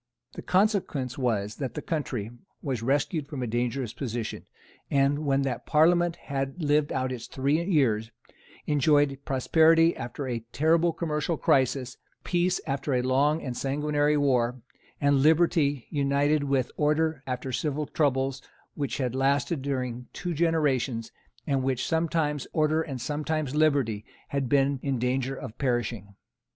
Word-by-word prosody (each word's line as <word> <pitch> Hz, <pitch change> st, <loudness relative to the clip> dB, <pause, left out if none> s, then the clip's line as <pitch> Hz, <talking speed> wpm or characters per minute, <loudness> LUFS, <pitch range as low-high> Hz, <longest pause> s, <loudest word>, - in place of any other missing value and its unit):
The -, -, -7 dB
consequence 185 Hz, -, +1 dB
was 110 Hz, -5 st, -1 dB
that 135 Hz, -3 st, -4 dB
the 150 Hz, -, -3 dB
country 125 Hz, -9 st, -3 dB, 0.3 s
was 130 Hz, -7 st, -2 dB
rescued 140 Hz, +4 st, 0 dB
from 140 Hz, -4 st, -5 dB
its 115 Hz, -, -4 dB
dangerous 120 Hz, 0 st, -1 dB
position, 120 Hz, -4 st, -5 dB, 0.4 s
and, 140 Hz, +1 st, +2 dB
when 135 Hz, 0 st, +2 dB
that 130 Hz, -2 st, -3 dB
Parliament 170 Hz, +2 st, +4 dB
had 135 Hz, -1 st, -4 dB
lived 150 Hz, -2 st, +2 dB
out 130 Hz, 0 st, -1 dB
its 120 Hz, -2 st, -6 dB
three 140 Hz, +5 st, 0 dB
years, 125 Hz, -, +1 dB, 0.6 s
enjoyed 145 Hz, -1 st, +3 dB
prosperity 160 Hz, +5 st, +4 dB
after 130 Hz, +3 st, -5 dB
a 120 Hz, -2 st, -2 dB
terrible 165 Hz, +3 st, +3 dB
commercial 160 Hz, -1 st, -2 dB
crisis, 130 Hz, -2 st, +1 dB, 0.3 s
peace 180 Hz, +1 st, +1 dB
after 135 Hz, -1 st, -1 dB
a 125 Hz, -, +1 dB
long 140 Hz, +5 st, +2 dB
and 125 Hz, -3 st, -4 dB
sanguinary 150 Hz, +2 st, +1 dB
war, 125 Hz, -3 st, +1 dB, 0.4 s
and 140 Hz, -1 st, +3 dB
liberty 155 Hz, -3 st, +3 dB
united 145 Hz, +1 st, +1 dB
with 135 Hz, -2 st, 0 dB
order 155 Hz, 0 st, +1 dB
after 130 Hz, +1 st, -3 dB
civil 150 Hz, +3 st, -1 dB
troubles 135 Hz, -2 st, 0 dB, 0.3 s
which 140 Hz, -2 st, -3 dB
had 125 Hz, -4 st, -1 dB
lasted 135 Hz, +3 st, +1 dB
during 125 Hz, -3 st, -3 dB
two 175 Hz, -, -3 dB
generations, 145 Hz, -8 st, 0 dB, 0.3 s
and 140 Hz, -2 st, +1 dB
in -, -, -3 dB
which 130 Hz, -1 st, 0 dB
sometimes 160 Hz, -3 st, 0 dB
order 155 Hz, 0 st, +2 dB
and 135 Hz, -5 st, -5 dB
sometimes 150 Hz, +2 st, -2 dB
liberty 140 Hz, -9 st, +2 dB, 0.3 s
had 140 Hz, -3 st, -1 dB
been 140 Hz, -1 st, +2 dB
in 135 Hz, -2 st, -1 dB
danger 130 Hz, +2 st, -1 dB
of 110 Hz, -, -8 dB
perishing. 120 Hz, -6 st, -2 dB
140 Hz, 145 wpm, -27 LUFS, 130-155 Hz, 0.6 s, Parliament